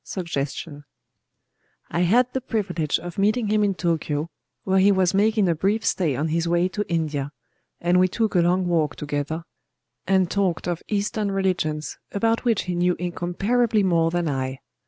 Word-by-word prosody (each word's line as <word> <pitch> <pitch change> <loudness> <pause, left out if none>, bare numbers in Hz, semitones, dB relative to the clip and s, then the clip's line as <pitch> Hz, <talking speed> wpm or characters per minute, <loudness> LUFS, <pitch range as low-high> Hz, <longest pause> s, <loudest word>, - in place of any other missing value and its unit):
Suggestion 150 -3 -4 1.1
I 170 - -1
had 235 +8 +3
the 265 - -1
privilege 185 - -1
of 175 +2 -7
meeting 215 +2 +2
him 210 0 +2
in 200 -2 +1
Tōkyō, 160 -3 -1 0.3
where 190 0 +2
he 200 +2 +5
was 190 -2 +2
making 210 0 +3
a 170 - +3
brief 200 +7 0
stay 160 -8 +1
on 155 +5 -1
his 165 +2 0
way 175 +1 +2
to 210 +2 -2
India;—and 150 +2 -2
we 185 - +5
took 220 +3 -1
a 180 - +4
long 180 +2 +2
walk 160 -4 +1
together, 150 +2 -3 0.6
and 190 -1 +2
talked 190 -5 0
of 175 -2 -2
Eastern 210 0 -1
religions, 180 -6 -1
about 225 +4 0
which 230 -4 +2
he 180 - -3
knew 175 0 +2
incomparably 200 +6 0
more 165 -3 +3
than 175 0 -1
I. 130 -2 -2
180 Hz, 165 wpm, -24 LUFS, 165-200 Hz, 1.1 s, he